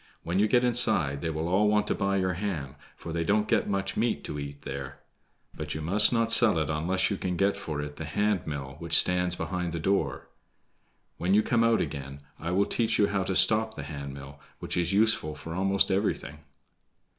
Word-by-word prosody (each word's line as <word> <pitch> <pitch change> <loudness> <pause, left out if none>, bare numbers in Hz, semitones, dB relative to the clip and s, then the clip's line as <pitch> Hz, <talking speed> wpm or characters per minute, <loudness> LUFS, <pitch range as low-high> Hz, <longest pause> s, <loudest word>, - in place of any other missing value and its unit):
"When 85 +3 -1
you 105 - +4
get 120 +3 +3
inside 110 - +2
they 80 - -2
will 80 +1 -3
all 95 +4 +2
want 105 0 +2
to - - 0
buy 100 0 0
your 95 -1 0
ham, 85 -8 -4 0.2
for 85 - -8
they 85 0 -1
don't 105 +4 +1
get 110 -3 +1
much 100 -1 -2
meat 110 -10 -1
to 75 - -5
eat 70 0 -8
there. 70 -1 -6 0.6
But 75 -1 -6
you 75 - -4
must 100 +6 +3
not 115 -1 +1
sell 115 -6 +5
it 80 0 -1
unless 90 +6 0
you 100 - -1
can 90 -2 -3
get 100 +2 +2
for 80 -7 -5
it 75 0 -8
the - - -5
hand 105 -4 -1
mill 70 -2 -6
which 85 -1 +3
stands 90 -1 +3
behind 90 -2 -3
the 85 - -3
door. 95 +4 -1 0.9
When 90 +3 +2
you 105 - +4
come 115 +1 +2
out 115 -1 +3
again 70 -2 -6 0.2
I 85 - -4
will 95 +3 +2
teach 115 -2 0
you 105 - +3
how 100 -1 0
to 95 0 -2
stop 110 +3 +4
the 70 - -6
hand 70 -1 -7
mill, 70 0 -11 0.2
which - - -4
is 85 -1 0
useful 100 -7 +1
for 80 +2 -8
almost 95 +2 +2
everything." 95 -6 -2
90 Hz, 215 wpm, -27 LUFS, 75-105 Hz, 0.9 s, sell